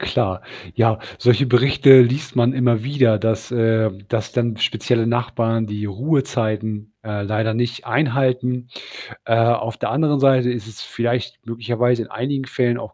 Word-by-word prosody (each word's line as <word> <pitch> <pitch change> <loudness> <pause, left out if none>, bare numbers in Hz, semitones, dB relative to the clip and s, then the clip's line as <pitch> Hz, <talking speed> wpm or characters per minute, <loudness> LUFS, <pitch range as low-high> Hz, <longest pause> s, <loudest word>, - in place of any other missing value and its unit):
Klar. 95 -1 -1 0.3
Ja, 115 -2 +2 0.2
solche 125 +3 +3
Berichte 130 +1 +6
liest 130 +2 -1
man 120 0 +3
immer 125 -4 +1
wieder, 130 -5 +2
dass, 110 +1 -2
äh 115 -2 +2 0.2
dass 115 -2 -3
dann 120 -2 -1
spezielle 115 0 0
Nachbarn 115 -1 -1
die 105 0 -5
Ruhezeiten, 110 -3 -2
äh, 105 -2 -5
leider 110 +2 -1
nicht 120 +2 -3
einhalten. 125 -3 0 0.6
Äh, 115 - 0
auf 115 0 +1
der - - -3
anderen 150 0 +1
Seite 130 -2 +3
ist 115 -3 -6
es 110 - -11
vielleicht 120 0 -3
möglicherweise 120 +1 -1
in 110 - -8
einigen 135 +3 -3
Fällen 120 -2 -1
auch - - -9
120 Hz, 155 wpm, -20 LUFS, 110-125 Hz, 0.6 s, Berichte